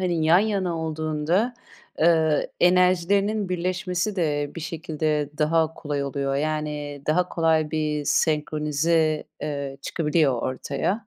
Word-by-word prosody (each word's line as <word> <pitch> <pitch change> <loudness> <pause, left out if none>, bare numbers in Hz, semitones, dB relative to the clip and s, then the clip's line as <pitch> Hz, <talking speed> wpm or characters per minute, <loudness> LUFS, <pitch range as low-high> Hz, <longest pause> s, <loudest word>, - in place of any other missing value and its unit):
hani, 175 -4 0
yan 165 +3 +6
yana 195 -5 0
olduğunda, 160 +8 -1 0.5
ııı, 160 -2 +3
enerjilerinin 185 +3 +3
birleşmesi 180 +2 -2
de 145 -4 0
bir 165 - -6
şekilde 155 -2 -2
daha 160 +1 +2
kolay 145 -2 -3
oluyor. 140 0 -2
Yani 150 -1 -3
daha 175 +4 +2
kolay 160 -3 +1
bir 150 -2 -1
senkronize, 155 +1 +1 0.2
eee, 140 -2 -4
çıkabiliyor 150 -6 +1
ortaya. 145 - -2
160 Hz, 115 wpm, -24 LUFS, 150-175 Hz, 0.5 s, yan